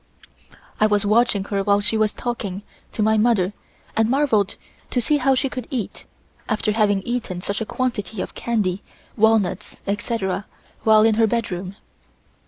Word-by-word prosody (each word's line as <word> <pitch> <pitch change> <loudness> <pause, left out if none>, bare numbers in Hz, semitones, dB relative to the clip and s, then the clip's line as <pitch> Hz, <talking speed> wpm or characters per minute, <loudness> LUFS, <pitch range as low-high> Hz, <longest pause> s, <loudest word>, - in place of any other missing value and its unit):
I 215 - +5
was 205 -1 +2
watching 215 -1 +3
her 200 0 -1
while 200 +1 +3
she 205 +2 0
was 215 -1 +2
talking 205 -5 -4 0.3
to 215 - 0
my 220 0 +3
mother 210 -4 +2 0.4
and 225 0 +2
marvelled 245 -7 +2 0.3
to 250 - 0
see 295 +6 +2
how 270 -1 +3
she 270 - +1
could 255 -2 -6
eat, 250 -8 -4 0.4
after 215 0 +1
having 205 -3 +2
eaten 230 -6 -3
such 200 +4 -3
a 220 - -3
quantity 225 -5 -2
of - - -4
candy, 205 -5 -1 0.3
walnuts, 220 -2 +1
etc., 200 -1 -2 0.3
while 215 -1 +5
in 225 0 +5
her 225 - +5
bedroom. 195 -5 -2
215 Hz, 160 wpm, -22 LUFS, 200-235 Hz, 0.4 s, I